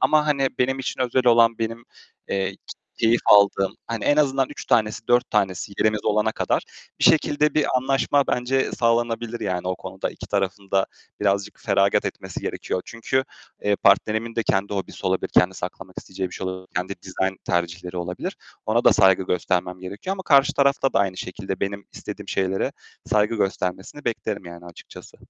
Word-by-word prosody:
ama, 155 -1 +3
hani, 140 -3 +2
benim 130 +1 +1
için 130 - -4
özel 125 0 +1
olan, 115 -1 +5
benim, 115 +1 -3 0.4
eee, 95 -1 0
k - - -43 0.4
keyif 115 +1 +4
aldığım 100 -1 +5
hani, 115 -2 -4
en 145 - +3
azından 135 -3 +2
3 145 - -8
tanesi, 110 -2 +1
4 120 +1 +3
tanesi 100 -2 0
yerimiz 110 -1 +1
olana 105 +1 +2
kadar - - 0 0.4
bir - - +2
şekilde 150 -1 +4
bir 150 - +3
anlaşma 135 +2 +2
bence 130 +2 0
sağlanabilir 115 0 0
yani 90 -4 -2
o 95 - -1
konuda. - - -5
2 - - -10
tarafın 100 0 -2
da 95 0 +2 0.3
birazcık 100 0 0
feragat 100 -1 +2
etmesi - - -5
gerekiyor. 90 - -3
Çünkü, 130 +3 -1 0.4
eee, 105 -1 +2
partnerimin 110 +3 +2
de 115 - +2
kendi 100 0 0
hobisi 95 - -4
olabilir, 95 0 0
kendi 90 +1 +3
saklamak 90 +1 -7
isteyeceği 95 0 -5
bir - - -10
şey 95 - -4
olabilir, 95 0 -6
kendi 90 +2 -1
dizayn 95 0 -2
tercihleri 85 +1 -2
olabilir. 90 0 -4 0.3
Ona 115 +2 +2
da - - +7
saygı 95 -1 +5
göstermem 90 0 -1
gerekiyor 100 - -5
ama 190 - -7
karşı 140 -5 +5
tarafta 140 -1 +2
da - - +3
aynı 95 -2 0
şekilde 95 +1 -5
benim 100 0 -3
istediğim - - -8
şeylere 95 0 0 0.3
saygı 105 +2 +2
göstermesini 95 +6 -2
beklerim 110 -4 -3
yani 85 0 -10
açıkçası. 85 -1 -13
105 Hz, 175 wpm, -23 LUFS, 95-120 Hz, 0.4 s, da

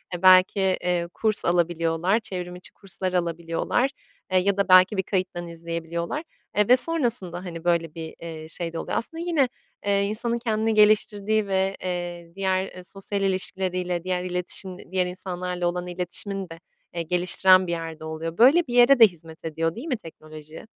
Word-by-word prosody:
e, 175 - -7
belki, 185 +1 +6
eee, 180 -2 0
kurs 215 -1 0
alabiliyorlar, 170 +3 +1
çevrim 180 -4 -4
içi 180 - -7
kurslar 185 -1 -3
alabiliyorlar, 170 +8 -1 0.4
eee, 185 - +3
ya 200 +2 0
da 200 -1 0
belki 185 +3 +6
bir 190 - +1
kayıttan 180 -2 -3
izleyebiliyorlar, 170 - -5 0.3
eee, 210 -1 +3
ve 250 - +7
sonrasında, 235 - +3
hani, 165 -2 -7
böyle, 170 -2 0
bir, 160 -1 -7
eee, 160 -2 -8
şey 165 +1 -4
de 165 - -4
oluyor. - - -3
Aslında 325 +7 -4
yine, 315 -7 +1 0.4
eee, 200 0 +2
insanın 225 +3 +1
kendini 225 -1 0
geliştirdiği 215 0 +3
ve, 190 0 0
eee, 175 -2 -5
diğer, 190 -1 0
eee, 185 -1 -11
sosyal 195 +2 -4
ilişkileriyle 185 -2 -2
diğer 180 -1 -2
iletişim 180 0 -6
diğer 185 -1 +1
insanlarla 180 -1 -3
olan 175 0 -3
iletişimini 180 +2 -1
de, 165 0 -10 0.3
eee, 170 - -3
geliştiren 185 +2 +4
bir - - -3
yerde 165 -2 -5
oluyor. 160 +1 -5
Böyle 280 +8 +5
bir 240 - -5
yere 245 +2 +6
de 225 - +10
hizmet 165 -3 -13
ediyor 165 +1 -2
değil 255 +8 -7
mi 255 - -1
teknoloji? 155 -3 -12
180 Hz, 170 wpm, -24 LUFS, 170-200 Hz, 0.4 s, de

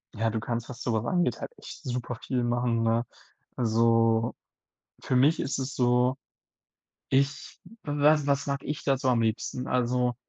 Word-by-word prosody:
Ja, 115 +1 +1
du 110 - -1
kannst, 115 +1 -3
was 125 - -8
sowas 115 -2 -1
angeht, 180 -2 +1
halt - - -6
echt - - -11
superviel 125 -1 -3
machen, 120 -1 +1
ne? 115 +1 +1 0.5
Also, 115 0 +2 0.7
für 130 - -1
mich 145 +6 +4
ist 135 - -2
es 135 +1 -3
so, 125 +1 +2 0.9
ich 140 +2 0 0.2
w 145 - -3
was 150 -1 +5
was 140 -1 +1
mag 140 -1 -1
ich 150 0 -4
da 135 -1 +2
so 130 - -1
am 120 -2 +3
liebsten? 115 +3 -2
Also, 125 0 +1
125 Hz, 165 wpm, -27 LUFS, 115-135 Hz, 0.9 s, was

